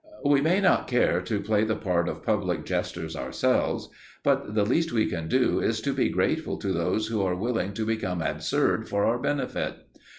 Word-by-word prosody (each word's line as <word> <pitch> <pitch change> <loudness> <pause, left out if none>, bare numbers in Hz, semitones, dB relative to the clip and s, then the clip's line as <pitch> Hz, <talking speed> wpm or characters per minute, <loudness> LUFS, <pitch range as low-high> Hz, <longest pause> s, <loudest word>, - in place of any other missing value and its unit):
We 140 -1 +4
may 170 +6 +3
not 195 - +3
care 120 -8 +2
to 100 +3 -2
play 105 +1 +1
the 110 0 0
part 90 -4 0
of - - -6
public - - 0
jesters 80 -2 -3
ourselves, - - 0 0.4
but 105 - +1
the 105 -2 +3
least 165 +9 +1
we 110 -2 +2
can 80 -2 -3
do - - +2
is - - 0
to - - -1
be - - +1
grateful - - 0
to 95 - -2
those 90 +5 0
who 110 -2 -1
are 95 -2 +1
willing 100 -1 -1
to 110 0 -2
become 110 -5 -1
absurd 80 - 0
for 100 0 +1
our 120 +2 +1
benefit. 145 +2 -2
105 Hz, 195 wpm, -26 LUFS, 90-120 Hz, 0.4 s, We